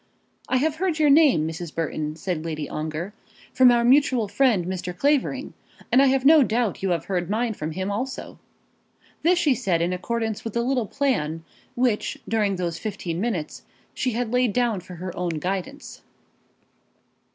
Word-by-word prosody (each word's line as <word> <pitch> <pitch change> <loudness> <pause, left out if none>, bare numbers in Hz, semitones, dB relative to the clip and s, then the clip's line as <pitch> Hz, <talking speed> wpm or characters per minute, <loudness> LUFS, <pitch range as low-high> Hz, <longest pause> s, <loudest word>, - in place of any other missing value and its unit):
"I 260 - +2
have 305 +3 0
heard 350 -2 0
your 300 -2 +4
name, 280 - +5
Mrs. 165 0 -6
Burton," 155 -2 -3
said 165 -1 -3
Lady 155 -2 -4
Ongar, 155 +5 -4 0.4
"from 255 -1 +6
our 240 -1 +4
mutual 255 -3 +4
friend, 220 -5 +2
Mr. 180 -1 -4
Clavering, 280 0 0 0.4
and 255 - +6
I 275 - +5
have 265 0 +1
no 310 +1 +8
doubt 235 -3 0
you 195 - 0
have 170 -3 -1
heard 180 -2 -2
mine 225 +2 0
from 155 -5 -5
him 190 +4 -3
also." 255 +6 -5 0.8
This 350 +3 +3
she 305 -6 +3
said 190 -7 0
in 170 +2 0
accordance 220 +3 -3
with 225 - -5
the 235 - 0
little 250 -3 0
plan 165 - -1 0.3
which 240 -4 0
during 210 -3 +1
those 175 -2 -3
fifteen 185 -5 -4
minutes 195 -10 -3 0.3
she 255 - -1
had 240 0 -2
laid 250 -4 +2
down 235 -4 +1
for 180 0 -11
her 180 +1 -6
own 175 -2 -2
guidance. 195 - -5
215 Hz, 175 wpm, -24 LUFS, 175-255 Hz, 0.8 s, no